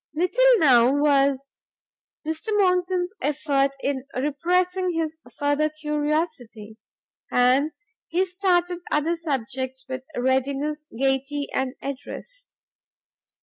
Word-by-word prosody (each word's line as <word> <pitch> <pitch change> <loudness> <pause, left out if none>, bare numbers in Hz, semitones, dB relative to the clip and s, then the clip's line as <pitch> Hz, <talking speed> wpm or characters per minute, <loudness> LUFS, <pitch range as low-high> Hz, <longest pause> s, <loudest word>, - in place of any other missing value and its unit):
Little 475 +9 +4
now 255 - +5
was 275 -2 +2 0.7
Mr 320 +3 -3
Monckton's 365 -1 +1
effort 280 -2 +1
in 275 -2 -1
repressing 355 +7 0
his 320 -1 -2 0.2
further 290 +1 +1
curiosity, 300 -8 -3 0.5
and 255 +5 +3 0.4
he 360 +3 +1
started 360 -2 +1
other 305 +3 +1
subjects 265 -4 -4
with 260 0 -4 0.2
readiness, 275 +4 0
gaiety 275 +2 0
and 265 0 -1
address. - - -7
295 Hz, 95 wpm, -24 LUFS, 270-345 Hz, 0.7 s, now